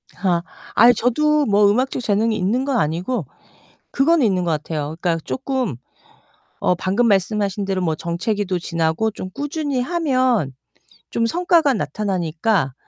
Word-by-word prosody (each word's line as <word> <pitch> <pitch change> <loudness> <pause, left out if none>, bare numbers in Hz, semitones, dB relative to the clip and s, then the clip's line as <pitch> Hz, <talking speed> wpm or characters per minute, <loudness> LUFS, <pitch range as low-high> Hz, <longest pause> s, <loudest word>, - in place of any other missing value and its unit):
아 180 -3 0 0.3
아이 240 +1 +7
저도 300 +6 +2
뭐 205 -1 +4
음악적 250 +4 0
재능이 220 0 +1
있는 215 +8 0
건 275 -3 0
아니고, 175 - -1 0.7
그거는 305 0 +3
있는 185 -4 +1
것 165 - 0
같아요. 150 0 -3
그니까 170 -2 +1
쪼끔 260 - -2 0.8
어 - - +2
방금 195 +7 +1
말씀하신대로 195 -1 0
뭐 160 -3 0
정체기도 185 +3 -2
지나고 165 +5 -1
좀 185 -2 -7
꾸준히 290 - -2
하면 255 - +1 0.6
좀 230 - 0
성과가 335 0 +3
나타나니까 175 - -1
210 Hz, 300 characters per minute, -20 LUFS, 175-255 Hz, 0.8 s, 아이